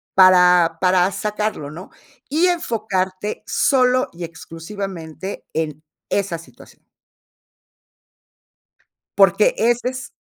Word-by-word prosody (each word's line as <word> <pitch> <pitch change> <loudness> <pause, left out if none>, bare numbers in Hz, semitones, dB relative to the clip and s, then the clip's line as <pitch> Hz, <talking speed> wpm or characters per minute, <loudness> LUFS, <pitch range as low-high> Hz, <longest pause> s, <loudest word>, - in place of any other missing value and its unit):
para 180 -3 +6
para 185 +1 +3
sacarlo, 210 -8 -3
¿no? 175 +5 -10 0.4
Y 320 +5 +2
enfocarte 210 - -2
solo 255 -1 +2
y 170 0 -8
exclusivamente 165 +1 -7
en 155 -1 -3 0.3
esa 195 -4 -1
situación. 165 - -17 2.3
Porque 195 +1 +4
ese 240 +2 +2
es 255 0 -8
190 Hz, 90 wpm, -20 LUFS, 170-215 Hz, 2.3 s, para